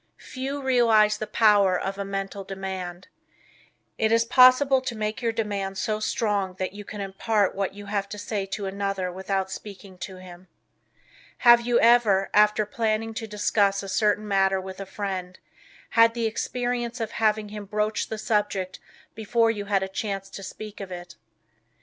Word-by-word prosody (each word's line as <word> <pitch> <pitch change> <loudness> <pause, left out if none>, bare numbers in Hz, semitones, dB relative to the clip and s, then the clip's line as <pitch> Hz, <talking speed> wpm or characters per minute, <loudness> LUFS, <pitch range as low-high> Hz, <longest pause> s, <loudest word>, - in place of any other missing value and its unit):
Few 270 +2 -5
realize 225 -5 +4
the 215 - -4
power 205 -5 +4
of 195 +1 -4
a - - -1
Mental 195 0 -4
Demand. 190 -2 -6 0.9
It 220 0 +2
is 230 0 +4
possible 255 +2 +6
to 255 -2 -4
make 215 +1 -3
your 230 -1 +1
demand 200 -4 -3
so 215 +3 -1
strong 205 -4 -1
that 185 0 -4
you 205 0 -8
can 205 0 -7
impart 200 +1 0
what 195 0 -3
you 205 0 -9
have 200 -1 -2
to 210 - -6
say 205 -1 -3
to 200 +1 -4
another 195 -1 -2
without 190 +1 -2
speaking 195 -2 -9
to 190 - -7
him. 185 0 -13 1.0
Have 240 0 +8
you 240 0 +2
ever, 225 -5 +4
after 210 0 +4
planning 225 +1 -1
to 225 0 -5
discuss 205 -1 +1
a - - -6
certain 210 +1 +1
matter 195 -1 +2
with 190 0 -8
a 195 - -6
friend, 185 -2 -5 0.5
had 230 0 +5
the 235 -1 -1
experience 245 +2 -2
of 225 -1 -3
having 215 -1 0
him 210 0 -7
broach 210 +1 -1
the 220 - -4
subject 205 -3 -1 0.3
before 225 +1 +1
you 205 -2 -5
had 200 -1 +1
a - - -2
chance 195 0 -4
to - - -8
speak 210 +2 -8
of 195 -2 -7
it? 175 0 -8
205 Hz, 175 wpm, -25 LUFS, 195-225 Hz, 1.0 s, Have